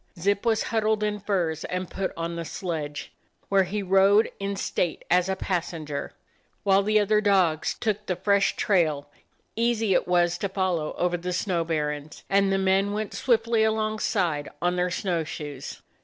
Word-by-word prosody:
Zip 200 +3 +1
was 220 -1 +2
huddled 220 -1 0
in 210 0 -1
furs 180 -6 -1
and 180 0 -3
put 190 +2 -3
on 170 0 -3
the 170 - -3
sledge, 155 -3 -5 0.4
where 195 -1 +4
he 200 +3 -3
rode 195 +3 +4
in 200 0 -2
state 180 -2 -2
as 180 +1 +3
a 190 - +1
passenger, 165 -6 -3 0.5
while 195 0 +4
the 215 +1 +3
other 210 +1 +3
dogs 185 -7 +2
took 210 -1 -2
the 180 - 0
fresh 200 +2 +2
trail 155 -7 +1 0.2
— - - -43
easy 225 -3 +1
it - - +1
was 175 -1 +2
to 200 - -2
follow 185 -5 -1
over 175 0 +1
the 180 +1 -4
snow 175 -2 0
barrens 150 -2 -3
— - - -40
and 195 0 +3
the 195 - +2
men 195 +1 +2
went 215 0 -3
swiftly 230 -2 +2
alongside 215 -8 0
on 175 0 +1
their 180 0 +1
snow 175 -2 -1
shoes. 145 -3 -7
190 Hz, 175 wpm, -26 LUFS, 170-205 Hz, 0.5 s, where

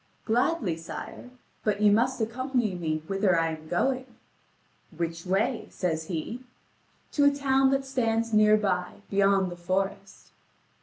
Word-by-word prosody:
"Gladly, 235 - +1
sire: 165 +8 -8 0.3
but 210 -1 0
you 210 -1 +5
must 250 +5 +2
accompany 240 -1 -1
me 155 -3 -2
whither 195 -2 +2
I 165 0 +1
am 155 -1 -7
going." 255 +10 0 0.9
"Which 165 +1 -3
way?" 220 +6 0
says 160 -3 -2
he. 180 +9 -4 0.7
"To 285 - +3
a - - +8
town 270 -1 +2
that 270 0 0
stands 230 -4 0
near 215 0 +6
by, 185 -4 -1 0.2
beyond 195 -2 +3
the - - -6
forest." 190 +2 -3
205 Hz, 140 wpm, -27 LUFS, 180-250 Hz, 0.9 s, a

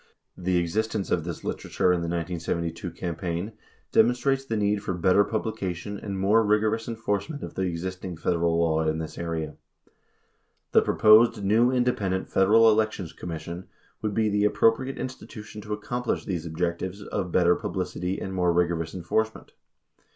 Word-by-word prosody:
The 90 0 0
existence 105 +4 -1
of 85 - +1
this 85 -2 -6
literature 90 - 0
in 90 - 0
the 85 - -2
1972 85 0 -3
cam 85 0 -5
paign 85 +4 -3 0.4
demonstrates 125 +4 +3
the 115 -5 -2
need 105 0 +1
for 95 -3 -3
better 90 +3 +4
publication 100 -3 -3
and 100 -2 -5
more 105 +4 +4
rigorous 110 +1 +1
enforcement 115 +5 -3
of - - -6
the - - -3
existing 90 +1 -5
Federal 85 0 +1
law 80 -1 +2
in 80 0 0
this 80 -1 -6
area. 80 -3 -3 1.1
The - - +6
proposed 110 0 +5
new 110 +5 +4
independent 105 -7 0
Federal 110 +4 +6
Elections 105 -6 0
Commission 85 +2 -7 0.3
would 105 -2 -2
be 110 -1 +2
the 105 0 +2
appro 115 +2 +4
priate 130 +3 -6
institution 110 -4 -7
to 105 0 -5
accomplish 120 +3 -2
these 85 -3 -3
objectives 90 +4 -3
of 95 -4 -3
better 90 0 +4
publicity 90 0 -3
and 95 - -5
more 90 -2 +2
rigorous 85 -1 0
enforcement. 110 +5 -2
95 Hz, 155 wpm, -26 LUFS, 85-110 Hz, 1.1 s, The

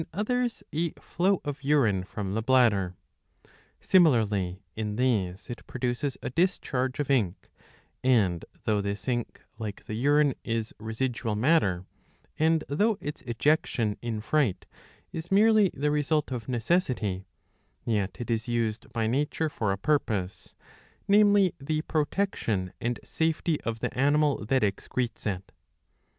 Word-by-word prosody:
others, 240 +5 -1
a 165 +3 0
flow 185 +2 0
of 145 0 -5
urine 125 -10 +3
from 95 0 -5
the 110 - 0
bladder.20 110 -8 0 0.3
Similarly 105 - +3
in 105 -1 -3
these 105 -7 0
it 120 - -8
produces 125 +2 -2
a - - -3
discharge 130 -5 0
of 145 -1 0
ink, 105 -9 0 0.5
and 105 -10 +3 0.2
though 105 -2 +1
this 100 +3 -4
ink, 120 -2 -2 0.2
like 105 -2 -6
the - - -6
urine, 145 +4 +3
is 115 -1 -2
residual 110 0 -2
matter, 105 - +2 0.5
and 160 0 +3
though 205 +9 +2
its 150 -4 -6
ejection 120 -3 +1
in 115 -3 -3
fright 130 -5 +1 0.5
is 165 +1 -5
merely 215 0 +5
the 150 +2 -1
result 150 0 +1
of 120 -3 -4
necessity, 120 - 0 0.6
yet 100 -4 -1
it 120 0 -4
is 115 0 -1
used 115 -2 -2
by 115 -2 -1
nature 145 +6 0
for 110 -8 -1
a 95 - -1
purpose,^' 105 -8 -1 0.5
namely 205 -3 +5
the 155 +3 -2
protection 150 - -1
and 120 -1 -1
safety 160 -1 0
of 115 -1 -4
the - - -2
animal 145 0 +2
that 130 +2 +2
excretes 110 +4 -2
it. 95 -1 -4
125 Hz, 135 wpm, -28 LUFS, 105-150 Hz, 0.6 s, merely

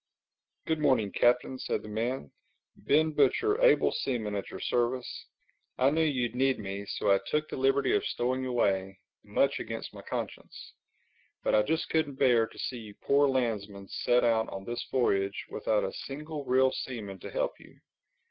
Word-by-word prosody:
"Good 160 -1 0
morning, 130 -9 +2
Captain," 125 +2 +2
said - - -2
the - - -9
man. 110 - -3 0.4
"Ben 155 +2 +2
Butcher, 415 - +2
able - - +5
seaman, 115 -6 -2
at 100 -1 -3
your - - -8
service. 125 +1 -1 0.5
I 130 +2 +4
knew 160 +2 +2
you'd 130 -7 0
need 130 +1 +2
me, 100 0 -6
so - - 0
I 100 - +5
took 150 0 0
the - - -6
liberty 135 +1 +2
of 410 - +1
stowing 130 - -1
away—much 100 +3 -1
against 115 0 -6
my - - -9
conscience. - - -6 0.7
But - - +1
I 105 - +6
just 160 +8 -1
couldn't 155 -4 +1
bear 120 -5 +4
to - - -17
see 125 - -3
you 105 -2 -11
poor 140 +1 +3
landsmen 105 -7 -2
set 120 0 +2
out 115 -1 +2
on 95 0 -7
this 120 0 -3
voyage 100 -6 0
without 110 -1 0
a 95 - -3
single 150 +1 -6
real 130 +1 +4
seaman 105 -9 -6
to - - -8
help - - -2
you. - - -17
125 Hz, 170 wpm, -29 LUFS, 105-140 Hz, 0.7 s, I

